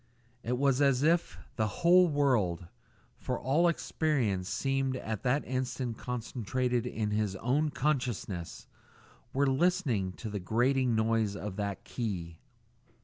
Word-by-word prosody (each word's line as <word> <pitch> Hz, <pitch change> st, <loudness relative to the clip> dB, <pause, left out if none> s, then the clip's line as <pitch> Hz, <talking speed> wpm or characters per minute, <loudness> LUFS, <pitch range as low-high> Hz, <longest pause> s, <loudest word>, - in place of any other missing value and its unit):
It 125 Hz, +2 st, -1 dB
was 135 Hz, 0 st, +2 dB
as 135 Hz, -1 st, +3 dB
if 170 Hz, +2 st, +2 dB, 0.2 s
the 110 Hz, -1 st, +2 dB
whole 175 Hz, -, +5 dB
world 125 Hz, -, +1 dB, 0.5 s
for -, -, -3 dB
all 150 Hz, +7 st, +3 dB
experience 130 Hz, -, 0 dB
seemed 135 Hz, -1 st, 0 dB
at 110 Hz, -4 st, -4 dB
that 135 Hz, +3 st, +1 dB
instant 130 Hz, -2 st, -3 dB
concentrated 125 Hz, 0 st, -2 dB
in 110 Hz, -3 st, -2 dB
his 105 Hz, -2 st, 0 dB
own 135 Hz, +9 st, +1 dB
consciousness 125 Hz, -, -2 dB, 0.7 s
were 140 Hz, +2 st, +2 dB
listening 135 Hz, -, +1 dB
to 110 Hz, +2 st, -7 dB
the 105 Hz, -, -3 dB
grating 120 Hz, +5 st, +1 dB
noise 110 Hz, -2 st, +1 dB
of 100 Hz, -1 st, -5 dB
that 100 Hz, -2 st, -3 dB
key. 90 Hz, -9 st, -4 dB
125 Hz, 130 wpm, -30 LUFS, 105-140 Hz, 0.7 s, whole